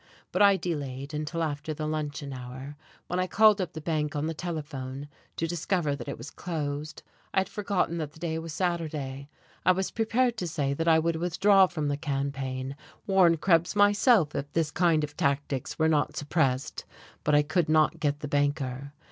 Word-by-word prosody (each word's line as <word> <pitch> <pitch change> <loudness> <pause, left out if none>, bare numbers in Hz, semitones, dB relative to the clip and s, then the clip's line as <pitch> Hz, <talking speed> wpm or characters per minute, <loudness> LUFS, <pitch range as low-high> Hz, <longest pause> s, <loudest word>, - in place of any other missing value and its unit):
But 185 - 0
I 200 -1 +7
delayed 140 -5 -4
until 155 +2 -2
after 155 0 -3
the 155 - -4
luncheon 150 -2 -3
hour, 130 +3 -8 0.3
when 180 - -2
I 185 - +1
called 215 0 +5
up 180 - -4
the 160 - -5
bank 155 -1 -1
on 145 +1 -1
the 165 - -2
telephone, 145 -5 -5 0.3
to 165 - -1
discover 165 -2 0
that 140 - -8
it - - -4
was 150 - -9
closed. 155 -3 -4 0.3
I 190 - +5
had 190 - -4
forgotten 195 -5 -1
that 150 -2 -4
the 160 - -16
day 160 -1 -2
was 165 0 -6
Saturday. 150 -6 -3 0.3
I 185 - +5
was 190 +1 -2
prepared 235 +2 +1
to 180 - -2
say 145 -4 -1
that 165 +4 -2
I 160 -1 +6
would 165 0 +1
withdraw 190 +3 +4
from 155 -5 -3
the 145 0 0
campaign, 135 -2 -3 0.3
warn 185 -4 +5
Krebs 170 +2 +2
myself 205 - +4
if 145 +1 -4
this 160 -2 +1
kind 165 -3 +3
of 150 0 -5
tactics 140 -1 -1
were 160 - +3
not 155 -2 +1
suppressed. 140 -4 0 0.4
But 150 - +3
I 145 - +5
could 165 +2 0
not 155 -1 +3
get 145 -1 0
the 150 - -3
banker. 140 -1 -1
155 Hz, 190 wpm, -28 LUFS, 145-175 Hz, 0.4 s, I